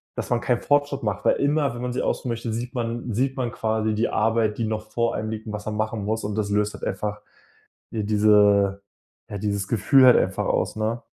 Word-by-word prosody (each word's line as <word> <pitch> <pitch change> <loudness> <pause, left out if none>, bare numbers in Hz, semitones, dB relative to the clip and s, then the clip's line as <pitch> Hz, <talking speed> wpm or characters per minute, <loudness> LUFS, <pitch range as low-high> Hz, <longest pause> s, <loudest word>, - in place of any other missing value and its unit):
dass - - -4
man 120 -1 +1
keinen 120 -1 0
Fortschritt 145 -2 +1
macht, 100 -2 -2
weil - - +4
immer, 145 -2 +1
wenn 120 - -7
man 125 0 -3
sich - - -2
ausruhen 125 - -2
möchte, 115 -1 -3
sieht 120 +3 -5
man 120 0 -3
sieht 130 +4 0
man 120 -2 -1
quasi 110 -1 -1
die 110 - 0
Arbeit, 110 -1 +1
die 115 - -1
noch 110 0 -4
vor 115 +1 0
einem 110 +1 -3
liegt 110 0 -6
und 105 - -5
was 105 0 -6
man 105 -1 -3
machen 110 -1 -2
muss. 110 +1 -2
Und 105 0 -3
das 105 -1 -1
löst 105 0 +1
halt - - -11
einfach 105 0 -3 0.7
ja 110 - -2
diese 105 -2 +4 0.5
ja, 100 - -5
dieses 100 -1 -2
Gefühl 120 +5 +4
halt 125 - +8
einfach - - 0
aus, - - 0
ne? 110 +2 -1
110 Hz, 230 wpm, -24 LUFS, 105-120 Hz, 0.7 s, halt